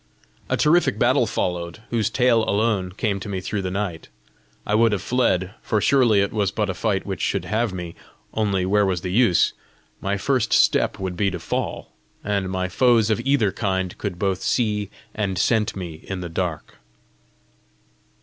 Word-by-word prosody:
A - - +1
terrific 170 +4 +3
battle - - +3
followed, 90 +3 -3
whose 115 -3 +1
tale 120 -1 +3
alone 100 -3 0
came 100 -1 -1
to 100 - -7
me 95 -2 -2
through 100 +2 -3
the 95 - -3
night. 90 -4 -4 0.6
I 105 - -1
would 115 0 +4
have 100 - -1
fled, 100 -7 +1
for 110 - 0
surely 120 -4 +4
it 100 - -1
was 105 -3 +1
but 105 0 -1
a - - -4
fight 95 +2 -1
which 95 -4 -4
should - - -1
have 110 0 0
me! 90 -2 -6 0.4
only 100 -4 0
where 105 +2 +3
was 95 -3 0
the 90 - -4
use? 105 -3 +3 0.5
my 100 +1 -1
first 120 +2 0
step - - +3
would 95 -2 -4
be 100 +2 +1
a 95 -2 -1
fall! - - -4 0.3
and 100 -2 -1
my 95 0 -1
foes 115 +2 +3
of 110 - +1
either 135 -8 +2
kind 95 -4 -2
could 100 -4 -4
both 95 0 -1
see 105 -4 0 0.2
and 100 -4 -2
scent 110 +3 +1
me 85 -5 -7
in 95 -1 -4
the 85 - -5
dark! 80 -5 -4
100 Hz, 180 wpm, -23 LUFS, 95-110 Hz, 0.6 s, would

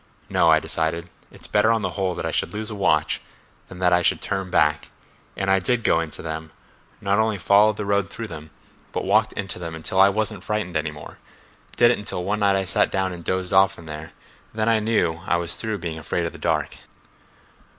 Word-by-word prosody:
No; - - +3
I - - +6
decided, 85 +1 -2 0.2
it's - - -4
better 105 +2 +3
on 115 -2 +1
the - - -1
whole 95 -3 -1
that - - -4
I - - -1
should - - -1
lose 110 +1 -4
a - - -5
watch 100 - +1 0.5
than 90 - -10
that 90 -1 +2
I 90 - +4
should - - +2
turn 95 -1 -3
back—and 75 +5 -2
I 95 - +4
did 115 +5 0
go 80 - +3
into 80 -2 -5
them—not 80 +5 -5
only 110 -1 +1
followed 105 +3 +4
the 105 - -3
road 100 -1 +1
through 115 +2 -6
them, 80 -6 -9 0.4
but - - -2
walked - - +3
into 95 -2 -5
them 85 -2 -5
until 90 +4 +1
I 100 - +7
wasn't 105 -1 -2
frightened 105 -5 -2
any 75 0 0
more—did 75 +9 -2
it 120 - -1
until 105 -3 -4
one 105 +3 -1
night 100 -1 +3
I 95 0 0
sat - - +2
down 95 -1 -1
and 85 -1 -9
dozed 95 +1 -1
off 95 0 +4
in 85 - -12
there; 75 +1 -8 0.4
then 110 0 0
I 115 -1 +4
knew 95 -7 0
I - - +3
was 85 0 +1
through 110 -2 -3
being 80 -4 -5
afraid 85 +2 -2
of 85 - -3
the - - -11
dark." - - -1
95 Hz, 215 wpm, -23 LUFS, 85-105 Hz, 0.5 s, I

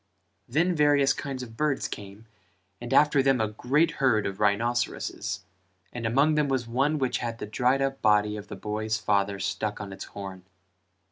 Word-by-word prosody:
Then 165 +8 +2
various 145 -3 +4
kinds 135 -2 -5
of 115 -2 -10
birds 150 0 0
came 100 +2 -9 0.6
and 120 - -6
after 150 -2 +5
them 135 -1 +3
a 110 -1 +1
great 145 +9 +1
herd 115 -6 +3
of 95 0 -4
rhinceroses 115 +4 -1 0.5
and 120 -2 -3
among 140 +7 +3
them 150 -1 +2
was 130 -3 -1
one 135 +6 +1
which 130 -3 0
had 115 -2 -4
the - - -5
dried 125 +5 +1
up 135 0 -2
body 105 -1 +3
of 105 -1 -8
the - - -7
boy's 110 +1 -2
father 100 -2 +1
stuck 100 +2 -3
on 100 -2 -6
its - - -7
horn. 95 -2 -8
120 Hz, 180 wpm, -27 LUFS, 105-135 Hz, 0.6 s, after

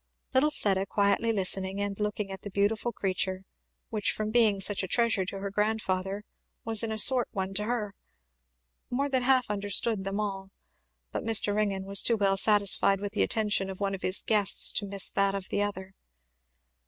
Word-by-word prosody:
Little 265 +4 +2
Fleda 195 -9 -2
quietly 205 +3 0
listening 195 -1 -1
and 200 0 -4
looking 210 -1 -4
at 190 - -8
the 205 - -8
beautiful 205 +4 -1
creature, 190 -2 -3 0.5
which 215 -3 -1
from 215 0 -5
being 220 -4 +3
such 195 +1 +3
a 190 - -4
treasure 225 -2 0
to 195 - -6
her 195 0 -6
grandfather 200 -2 -2 0.4
was 225 -2 +4
in 225 -1 -3
a 220 - -4
sort 250 +2 +5
one 190 -2 -4
to 210 +2 -2
her, 215 -3 -4 1.0
more 275 +3 -2
than 260 -2 0
half 255 0 +2
understood 205 +1 -1
them 195 +1 -4
all; 195 -2 -5 0.6
but - - -4
Mr. 220 -2 +3
Ringgan 200 -2 -2
was 195 0 +4
too 230 - 0
well 195 -2 +1
satisfied 200 -1 +5
with 205 0 -6
the 215 - -2
attention 210 -4 -1
of 190 - -8
one 200 -1 -2
of 195 - -7
his 185 - +2
guests 210 -3 +4
to 200 - -7
miss 195 -1 +1
that 200 -1 0
of 195 -1 -6
the 205 - -2
other. 190 -2 -5
205 Hz, 190 wpm, -27 LUFS, 195-220 Hz, 1.0 s, sort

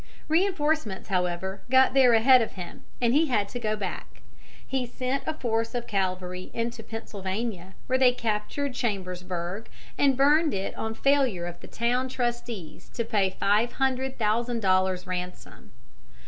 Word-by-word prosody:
Reinforcements, 310 - +1
however, 185 +1 -1
got 260 0 +5
there 260 -3 +6
ahead 250 +3 +7
of 225 - -2
him, 180 -2 -8 0.2
and 240 -1 +2
he 310 +3 +4
had 210 -7 +1
to 245 - -5
go 215 -2 0
back. 195 -4 -6 0.4
He 265 -1 -1
sent 255 +3 -2
a 315 - 0
force 230 -4 -1
of 240 -1 -2
cavalry 185 -2 -2
into 230 0 -2
Pennsylvania, 200 -3 -5
where 260 0 +1
they 255 -1 +6
captured 235 +4 -2
Chambersburg 185 -3 -3 0.3
and 275 -3 +4
burned 295 +2 +4
it 195 0 -3
on 220 0 -3
failure 265 -11 +2
of 175 0 -7
the - - -11
town 245 +3 0
trustees 240 -9 -4
to 235 - 0
pay 205 -4 +2
five 210 +5 +1
hundred 265 0 0
thousand 230 +2 0
dollars 185 -1 +2
ransom. 180 -1 -6
225 Hz, 150 wpm, -27 LUFS, 190-255 Hz, 0.4 s, ahead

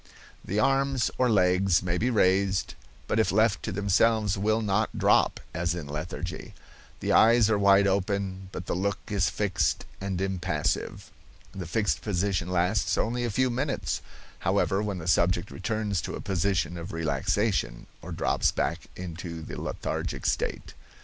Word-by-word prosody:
The 100 - -3
arms 135 0 +2
or 125 -1 +3
legs 90 -3 +3
may 90 -1 -1
be 125 - +1
raised, 95 -3 +2 0.3
but 110 - 0
if 110 - +2
left 110 +2 +2
to - - -4
themselves 105 +2 +2
will 110 +3 +1
not 105 +1 0
drop, - - +3
as 85 0 -1
in 85 -4 -5
lethargy. 80 +4 -6 0.5
The - - -1
eyes 115 -1 +5
are 105 - +2
wide 100 0 +5
open, 95 -1 -1
but 90 - -6
the - - -2
look 100 +3 -1
is 100 -3 +2
fixed 90 -8 0 0.2
and 95 -2 -3
impassive. 95 -5 -2 0.4
The 90 -3 -6
fixed 105 +3 0
position 95 -2 -1
lasts 90 +3 +1
only 120 +2 0
a - - -1
few 130 +4 +1
minutes, 135 +3 -2 0.4
however, 95 +1 +1
when 105 -3 -2
the 80 - -7
subject 90 +1 +2
returns 105 -5 -2
to - - -5
a - - -6
position 90 -2 -1
of 85 0 -7
relaxation, 80 - -1 0.2
or - - -8
drops - - +1
back - - -2
into 85 -2 -6
the - - -7
lethargic - - -4
state. - - -2
95 Hz, 155 wpm, -27 LUFS, 90-110 Hz, 0.5 s, eyes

